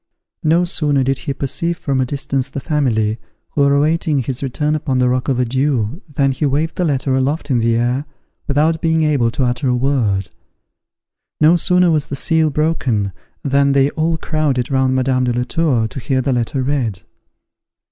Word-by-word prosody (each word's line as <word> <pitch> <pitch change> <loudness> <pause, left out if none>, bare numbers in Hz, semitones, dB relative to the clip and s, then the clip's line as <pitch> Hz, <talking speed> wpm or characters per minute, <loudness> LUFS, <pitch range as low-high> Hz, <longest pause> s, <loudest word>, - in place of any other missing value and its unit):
No 165 +2 +3
sooner 145 -5 +1
did 135 0 0
he 140 +3 -3
perceive 165 +6 -1
from 135 -4 -1
a 130 - 0
distance 135 -1 -2
the - - -5
family, 120 -8 0 0.3
who 145 - 0
were 140 0 +4
awaiting 155 +1 +1
his 125 +1 -3
return 150 +3 -1
upon 140 -4 -1
the 125 0 +3
rock 125 0 0
of 130 - +1
Adieus 130 - 0
than 135 -1 +1
he 135 - -4
waved 150 +3 0
the 180 - 0
letter 135 -3 0
aloft 145 +3 -1
in 125 - +2
the 115 0 +2
air, 120 +4 0 0.4
without 155 +3 +1
being 160 -1 +2
able 140 -6 +2
to 130 +3 -2
utter 125 +3 0
a 125 - +2
word. 115 -8 0 1.1
No 155 +3 +5
sooner 180 0 +3
was 150 -3 0
the 140 - -4
seal 160 +2 +2
broken, 135 - 0 0.3
than 140 0 +2
they 140 +1 +3
all 160 +1 0
crowded 150 -6 -1
round 130 -1 +2
Madame 130 0 +1
de 120 - 0
la 120 +1 0
Tour, 130 -5 0
to 135 - -7
hear 130 +2 -1
the 135 - 0
letter 125 +2 -1
read. 125 -9 -1
135 Hz, 190 wpm, -18 LUFS, 125-150 Hz, 1.1 s, No